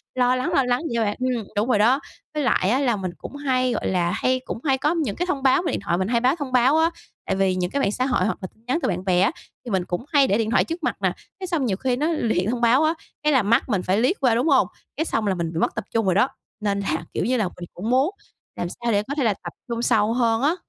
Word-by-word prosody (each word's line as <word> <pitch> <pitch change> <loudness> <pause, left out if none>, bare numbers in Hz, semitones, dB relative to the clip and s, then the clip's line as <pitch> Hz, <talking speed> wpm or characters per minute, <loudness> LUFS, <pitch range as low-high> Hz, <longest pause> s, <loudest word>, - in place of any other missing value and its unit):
lo 250 0 +3
lắng, 255 0 -1
lo 275 - +4
lắng 245 0 +1
vậy 235 - -3
thôi 230 -1 +2
bạn. 205 - -2
Ừm, 250 -4 -1
đúng 210 +3 +1
rồi 210 - +3
đó, 245 +6 +4 0.3
với 300 -1 -1
lại 195 -7 +2
á 250 +5 +2
là 250 -5 +2
mình 185 -3 -4
cũng - - -9
hay, 255 -3 0
gọi - - -2
là, 175 -2 +1
hay 255 +7 +1
cũng - - -4
hay 270 -3 +2
có 300 +5 +1
những 295 -12 -1
cái 355 - -1
thông 280 -7 -2
báo 265 +2 +4
về - - -1
điện - - -2
thoại 170 -3 0
mình, 185 +1 -1
hay 235 +1 +2
báo 260 +5 +3
thông 285 -5 -5
báo 255 +4 +4
á, 325 +1 +4 0.4
tại 190 - -1
vì 190 -1 +2
những 180 -1 -2
cái 280 - 0
mạng 200 - +1
xã 255 +4 -1
hội 250 -9 +1
hoặc 220 - -1
là 185 - -4
tin 220 - -30
nhắn 265 +6 +1
từ - - 0
bạn 180 0 -3
bè 180 -2 +3
á, 195 - +3 0.3
thì 240 - -5
mình 185 -2 0
cũng 180 +8 -4
hay 285 -4 +4
để 200 - +2
điện 225 -1 -1
thoại - - +4
trước 330 0 -6
mặt - - 0
nè, - - +2 0.3
thế 380 - -4
xong 335 -7 0
nhiều 195 -6 0
khi 255 +2 0
nó 295 +5 0
luyện 220 - 0
thông 245 0 -2
báo 240 +5 +4
á, 315 +1 +3 0.3
cái 300 0 +3
là 260 -5 +4
mắt 230 +5 +2
mình 200 -5 +1
phải 190 +2 +1
liếc 250 - +2
qua, 245 -4 +4
đúng 245 +6 +1
hông? - - +4 0.3
Cái 320 - 0
xong 225 -9 -1
là 190 - +1
mình 170 -1 -3
bị 165 - -2
mất - - 0
tập 220 - -3
trung 225 -2 +1
rồi 185 -2 +2
đó, 205 +6 +4 0.3
nên 200 -2 -1
là, 200 - -2
kiểu - - -1
như 255 +2 +1
là, 220 - +1
mình 180 0 -9
cũng 205 +6 -4
muốn 260 +5 +3 0.5
làm 175 - -3
sao 235 +5 -3
để 205 -1 +2
có 280 - -3
thể 280 - +1
là 220 -3 +3
tập - - -6 0.2
trung 235 0 -2
sâu 220 -1 +2
hơn 230 -2 +2
á. 300 +5 +2
240 Hz, 315 wpm, -23 LUFS, 200-265 Hz, 0.5 s, lo